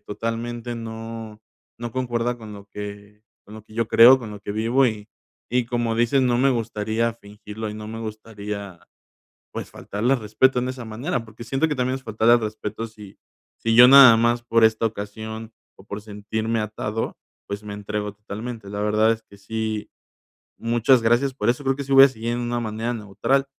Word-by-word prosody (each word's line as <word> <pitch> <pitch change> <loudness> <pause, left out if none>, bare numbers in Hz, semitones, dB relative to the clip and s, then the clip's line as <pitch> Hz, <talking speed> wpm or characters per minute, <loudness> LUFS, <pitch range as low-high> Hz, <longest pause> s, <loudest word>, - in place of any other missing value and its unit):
totalmente 115 +2 -4
no 115 -1 -7 0.4
no 120 0 -5
concuerda 120 -1 -1
con 110 -2 -10
lo 100 0 -12
que 105 0 -9 0.2
con 105 - -13
lo 110 -1 -11
que 110 - -17
yo 115 -1 -1
creo, 120 +4 +8
con 115 -3 -7
lo 105 - -8
que 100 - -5
vivo, 115 +5 +2
y 110 -2 -4 0.4
y 125 0 +1
como 120 -1 -1
dices, 120 +4 +3
no 120 -1 +2
me 135 +2 +4
gustaría 115 -1 -1
fingirlo, 105 0 -8
y 105 - -7
no 105 0 -7
me 115 +1 -6
gustaría, 105 -3 -7 0.8
pues, - - -5
faltarle 115 +6 -1
al 135 - 0
respeto 125 +5 +2
en 125 +1 -2
esa 130 -2 -6
manera, 120 +3 -3
porque 110 +1 -11
siento 135 +7 0
que 150 - -2
también 130 0 0
es 135 - -8
faltarle 110 +1 +3
al - - +2
respeto 110 +1 -4
si 105 -3 -14 0.4
si 115 0 +1
yo 125 +1 +10
nada 135 -3 +10
más, 120 +1 +2
por 115 -1 +2
esta 110 0 +4
ocasión 110 +2 -7 0.3
o - - -15
por 100 0 -6
sentirme 110 +2 -3
atado, 110 +1 -3 0.3
pues, 100 +1 -5
me 105 -1 -7
entrego 105 0 -4
totalmente. 105 +1 -7
La 105 0 -5
verdad 110 +1 +3
es 115 - -2
que 100 - -18
sí, 110 +1 -4 0.7
muchas 120 +2 +3
gracias 120 +4 +2
por 135 - -3
eso, 125 +4 0
creo 135 0 +1
que 140 - -3
sí 140 - -1
voy 135 0 +10
a - - +5
seguir 115 -1 -4
en 120 - -2
una 120 0 -2
manera 115 +1 -3
neutral. 115 +5 0
115 Hz, 200 wpm, -23 LUFS, 105-120 Hz, 0.8 s, yo